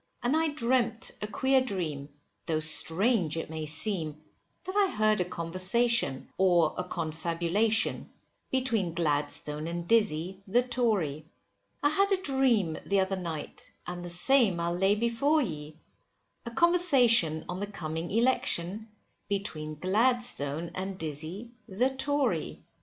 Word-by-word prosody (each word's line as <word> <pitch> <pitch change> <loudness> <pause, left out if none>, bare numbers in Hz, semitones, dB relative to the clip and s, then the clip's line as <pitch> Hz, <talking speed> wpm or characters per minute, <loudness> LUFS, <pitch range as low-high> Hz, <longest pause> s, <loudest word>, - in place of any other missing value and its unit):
And 245 +5 +1
I 320 0 +2
dreamt 250 -5 0
a 210 - -3
queer 265 +4 +2
dream, 165 - -4 0.4
though 160 -2 0
strange 165 +3 +2
it 165 - -5
may 155 -1 -4
seem, 155 -1 0 0.4
that 375 - -6
I 405 -2 +3
heard 215 -2 +2
a - - 0
conversation, 185 - +1
or 175 -4 +3
a 180 - -3
confabulation, 170 +7 -1 0.4
between 230 -10 -1
Gladstone 150 -1 -2
and 170 0 -5
Dizzy, 190 -4 +1
the 240 +6 +2
Tory. 210 - -1 0.6
I 290 - +4
had 395 +6 +2
a 390 - +3
dream 260 - +1
the 200 0 +1
other 190 0 0
night; 165 -5 -6
and 175 0 -6
the 175 - -6
same 195 +1 +4
I'll 170 0 -1
lay 195 +3 +2
before 235 +7 +1
ye, 150 -5 -7 0.7
A - - -2
conversation 245 - +4
on 180 +1 -5
the 205 - -3
coming 165 -4 -5
election, 215 -3 0 0.4
between 155 -7 -3
Gladstone 185 - 0
and 190 0 -5
Dizzy, 160 +9 -5 0.2
the 240 +8 0
Tory. 280 +1 -1
190 Hz, 135 wpm, -28 LUFS, 165-240 Hz, 0.7 s, I